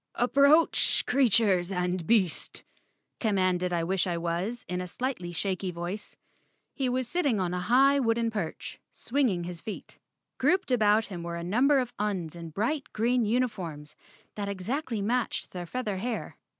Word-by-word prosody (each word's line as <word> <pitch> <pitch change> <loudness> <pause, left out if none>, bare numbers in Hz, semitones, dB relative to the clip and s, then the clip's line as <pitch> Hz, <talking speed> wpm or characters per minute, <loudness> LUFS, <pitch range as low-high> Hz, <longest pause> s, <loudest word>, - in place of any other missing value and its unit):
"Approach, 280 +6 +4
creatures 210 -8 +3
and 180 -2 -2
beast," 205 -7 +1 0.6
commanded 185 -4 +1
I 170 -1 0
wish 185 +2 0
I 175 -1 -1
was 175 +8 -3
in 180 0 -2
a 180 - -5
slightly 215 -4 -3
shaky 185 +2 -2
voice. 175 +4 -6 0.6
He 265 -2 -1
was 255 0 -1
sitting 280 - +1
on 180 -1 -1
a 180 - -1
high 265 +9 +4
wooden 230 -2 +1
perch, 195 -7 -5
swinging 235 -10 0
his 175 -1 -6
feet. 215 - -8 0.4
Grouped 370 -6 +2
about 215 -2 +4
him 180 -4 -7
were 170 0 -5
a 170 - -5
number 250 +11 +3
of 250 -2 -1
Uns 190 -6 -2
in 170 -1 -7
bright 235 - -2
green 235 +2 +2
uni¬ 245 +4 +2
forms 165 -9 -8 0.4
that 205 -1 -4
exactly 220 +3 -3
matched 245 +3 -1
their 175 -1 -6
feather 215 -3 -3
hair. 230 +3 -4
205 Hz, 160 wpm, -28 LUFS, 180-245 Hz, 0.6 s, Approach